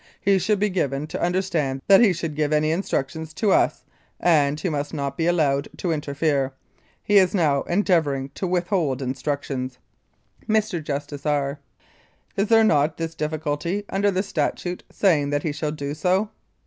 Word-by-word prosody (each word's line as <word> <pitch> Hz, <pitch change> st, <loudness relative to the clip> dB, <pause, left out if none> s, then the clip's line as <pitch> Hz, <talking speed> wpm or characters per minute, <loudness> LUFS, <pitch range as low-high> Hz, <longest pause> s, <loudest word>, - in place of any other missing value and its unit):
He 195 Hz, -1 st, +3 dB
should 205 Hz, +3 st, +1 dB
be 205 Hz, +1 st, 0 dB
given 145 Hz, -5 st, -1 dB
to 155 Hz, -, -6 dB
understand 170 Hz, -7 st, -1 dB
that 195 Hz, +1 st, +7 dB
he 225 Hz, -5 st, +6 dB
should 165 Hz, -2 st, -3 dB
give 150 Hz, 0 st, 0 dB
any 155 Hz, 0 st, +2 dB
instructions 160 Hz, -2 st, -2 dB
to 200 Hz, +5 st, +1 dB
us, -, -, +2 dB, 0.4 s
and 150 Hz, -4 st, +3 dB
he 170 Hz, -, -2 dB
must 145 Hz, -1 st, -3 dB
not 140 Hz, -2 st, -3 dB
be 165 Hz, +2 st, 0 dB
allowed 145 Hz, -5 st, +2 dB
to 175 Hz, -, -1 dB
interfere. 140 Hz, -2 st, 0 dB, 0.5 s
He 205 Hz, -1 st, +5 dB
is 185 Hz, +1 st, +2 dB
now 150 Hz, -6 st, +2 dB
endeavour 175 Hz, -6 st, +2 dB
ing 135 Hz, 0 st, -5 dB
to 190 Hz, -, -3 dB
withhold 175 Hz, -7 st, 0 dB
instructions. 130 Hz, -1 st, -3 dB, 0.7 s
Mr. 215 Hz, -6 st, +1 dB
JUSTICE 145 Hz, 0 st, -4 dB
R.: 145 Hz, -1 st, 0 dB, 0.8 s
Is 200 Hz, +2 st, +1 dB
there 225 Hz, 0 st, +5 dB
not 150 Hz, -6 st, +2 dB
this 165 Hz, -1 st, -3 dB
difficulty 155 Hz, +5 st, -2 dB
under 200 Hz, +1 st, +1 dB
the 190 Hz, 0 st, 0 dB
statute, 180 Hz, -2 st, -2 dB
saying 155 Hz, -8 st, +2 dB
that 145 Hz, 0 st, -1 dB
he 155 Hz, -, -1 dB
shall 150 Hz, +1 st, -3 dB
do 145 Hz, -1 st, -4 dB
so? 185 Hz, +7 st, +1 dB
155 Hz, 170 wpm, -23 LUFS, 145-185 Hz, 0.8 s, that